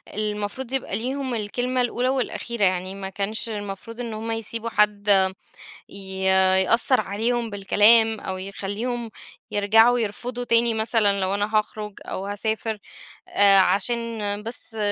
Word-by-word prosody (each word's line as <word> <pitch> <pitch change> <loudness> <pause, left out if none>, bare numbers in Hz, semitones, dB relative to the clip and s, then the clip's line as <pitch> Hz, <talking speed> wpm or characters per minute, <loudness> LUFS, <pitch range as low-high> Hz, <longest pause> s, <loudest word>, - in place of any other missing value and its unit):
المفروض 215 +4 -4
يبقى 260 -7 -1
ليهم 260 +1 -3
الكلمة 245 +4 -2
الأولى 245 +1 -1
والأخيرة 235 -4 -1
يعني، 185 +1 -1
ما 195 -1 -6
كانش 205 +4 -3
المفروض 205 +2 -7
إن 235 -2 -4
هُم 225 +1 -4
يسيبوا 225 +1 -3
حد 210 -1 +1 0.8
ي 190 -1 -6 0.4
يأثّر 235 +5 +4
عليهم 230 +4 -2
بالكلام، 215 +2 +4
أو 190 -1 -5
يخليهم 210 +5 -4 0.4
يرجعوا 225 +4 +4
يرفضوا 240 +3 -3
تاني 230 0 +3
مثلًا، 220 -3 +1
لو 190 +1 0
أنا 205 +2 -1
هاخرج 210 -1 -3
أو 190 - -5
هاسافر، 220 +1 -2 0.5
آآ، 200 -1 +5
عشان 210 +5 +2 0.5
بس 225 0 -5
220 Hz, 130 wpm, -23 LUFS, 200-235 Hz, 0.8 s, آآ